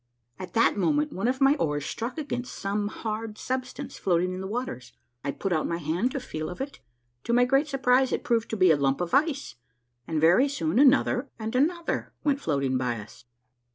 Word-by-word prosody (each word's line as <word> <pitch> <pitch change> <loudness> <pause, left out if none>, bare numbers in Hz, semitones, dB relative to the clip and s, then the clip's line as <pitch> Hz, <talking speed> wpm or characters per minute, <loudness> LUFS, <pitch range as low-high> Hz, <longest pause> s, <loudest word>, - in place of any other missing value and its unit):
At 185 - -8
that 230 -1 +3
moment 295 +7 +1
one 195 +5 -1
of 260 +1 0
my 270 +1 +6
oars 145 - -1
struck 235 +6 -4
against 245 -5 -4
some 205 +1 -2
hard 215 0 -5
substance 255 0 -4
floating 180 0 +1
in 185 - -5
the 190 - -4
waters. 205 - -5 0.3
I 140 - -2
put 190 +6 -2
out 155 - 0
my 170 - -1
hand 170 - 0
to 275 - -2
feel 155 -11 -5
of 180 - -8
it. 275 +1 -5 0.5
To 235 - 0
my 245 +1 +5
great 270 +4 +2
surprise 260 -2 +2
it - - -1
proved 230 -1 0
to 220 - -2
be 185 -3 +6
a 155 - +4
lump 135 -1 +1
of 175 -1 -3
ice, 285 - +1 0.5
and 160 -2 -1
very 175 - +5
soon 170 - 0
another 275 -1 +4
and 225 +1 -4
another 335 +6 0
went 285 -1 +1
floating 140 - 0
by 125 -2 -1
us. 105 +3 -13
225 Hz, 205 wpm, -27 LUFS, 170-265 Hz, 0.5 s, my